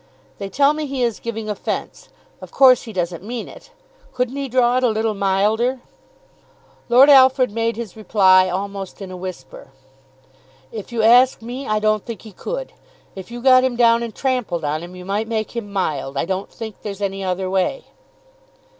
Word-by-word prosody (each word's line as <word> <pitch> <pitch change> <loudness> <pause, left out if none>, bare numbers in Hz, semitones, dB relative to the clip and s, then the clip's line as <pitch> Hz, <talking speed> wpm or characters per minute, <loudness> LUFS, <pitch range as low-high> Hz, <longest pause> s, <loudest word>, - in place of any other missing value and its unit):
"They 195 - -5
tell 280 +7 +3
me 305 -1 -4
he 270 -2 -2
is 235 -3 -1
giving 225 -2 -5
offence. 210 -2 -5 0.3
Of - - -10
course 260 -2 +5
he 225 - -8
doesn't 175 -3 -3
mean 235 +2 -5
it. - - -14 0.4
Couldn't 250 +1 -2
he 280 -1 -4
draw 245 0 +2
it 255 - 0
a 250 - +4
little 220 0 0
milder?" 210 +6 +1 1.1
Lord 250 +4 +7
Alfred 260 -3 +6
made 230 +1 -1
his 225 -4 -7
reply 190 -4 +4
almost 195 +1 -5
in 195 -2 -8
a - - -7
whisper. 180 -8 -9 1.0
"If 215 -1 -8
you 230 -2 -1
ask 245 +1 +5
me, 250 +4 -6
I 215 - +1
don't 215 -1 +1
think 230 -5 -8
he 220 - -11
could. - - -6 0.4
If 190 +1 -9
you 240 0 -8
got 255 -1 +6
him 260 -2 0
down 235 -1 +4
and 230 -3 -6
trampled 245 - -2
on 150 +2 -2
him, 175 +1 -10
you 180 0 -10
might 205 +3 -2
make 220 0 -3
him 215 -4 -5
mild. 145 -8 -2
I - - 0
don't 190 +2 -3
think 220 -3 -8
there's 205 -1 -7
any 195 0 -3
other 185 0 -2
way." 190 - -1
220 Hz, 190 wpm, -20 LUFS, 190-245 Hz, 1.1 s, Lord